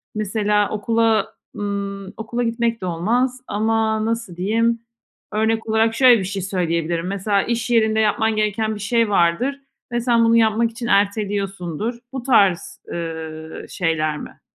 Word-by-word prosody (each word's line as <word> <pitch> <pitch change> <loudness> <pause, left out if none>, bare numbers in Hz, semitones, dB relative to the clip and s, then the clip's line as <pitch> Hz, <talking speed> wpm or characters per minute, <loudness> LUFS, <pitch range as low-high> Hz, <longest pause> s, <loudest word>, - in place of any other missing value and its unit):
mesela 210 0 +1
okula, 220 0 +1 0.2
ımm, 200 -1 -4
okula 240 +2 -3
gitmek 230 -1 -1
de - - -3
olmaz 240 +9 0
ama 220 0 0
nasıl 225 -6 -3
diyeyim? 230 +5 +1 0.5
Örnek 220 +1 0
olarak 225 +1 +2
şöyle 245 -3 +6
bir - - -2
şey 195 0 -3
söyleyebilirim. 170 -2 -1
Mesela 200 +1 0
iş 235 +1 -2
yerinde 220 -2 +3
yapman 220 +1 +2
gereken 215 +1 0
bir - - -8
şey 230 +1 +1
vardır 205 +10 +1 0.3
ve 240 0 0
sen 235 -1 +3
bunu 230 0 +4
yapmak 225 +1 +3
için 235 +1 -6
erteliyorsundur. 200 -1 0 0.2
Bu 260 -3 -4
tarz, 200 -8 +2
ııı, 160 -1 -6
şeyler 155 -3 -1
mi? - - -10
215 Hz, 145 wpm, -21 LUFS, 195-230 Hz, 0.5 s, şöyle